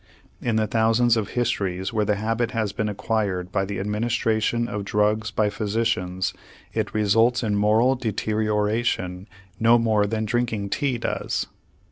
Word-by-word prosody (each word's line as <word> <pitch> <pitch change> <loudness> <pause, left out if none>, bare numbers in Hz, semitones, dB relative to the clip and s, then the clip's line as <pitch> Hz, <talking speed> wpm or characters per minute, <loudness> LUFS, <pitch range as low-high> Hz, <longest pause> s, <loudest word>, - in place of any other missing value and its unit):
In 120 -2 0
the 110 0 +2
thousands 115 +2 +3
of 110 -3 -1
histories 100 -5 -1
where 105 -2 +1
the 105 - +1
habit 115 +3 -1
has 110 -3 0
been 105 0 -1
acquired 100 -3 -2
by 95 - 0
the 100 0 -4
administration 110 +2 0
of 105 -2 -4
drugs 105 +2 +1
by 105 -1 0
physicians 100 -4 -1 0.4
it - - -2
results 115 +4 +3
in 105 -2 0
moral 110 +5 +4
deterioration 105 -4 -1 0.3
no 115 +1 +6
more 110 -3 +2
than 110 +1 -1
drinking 110 -3 -1
tea 140 -4 0
does. 115 - -2
110 Hz, 145 wpm, -24 LUFS, 105-115 Hz, 0.4 s, no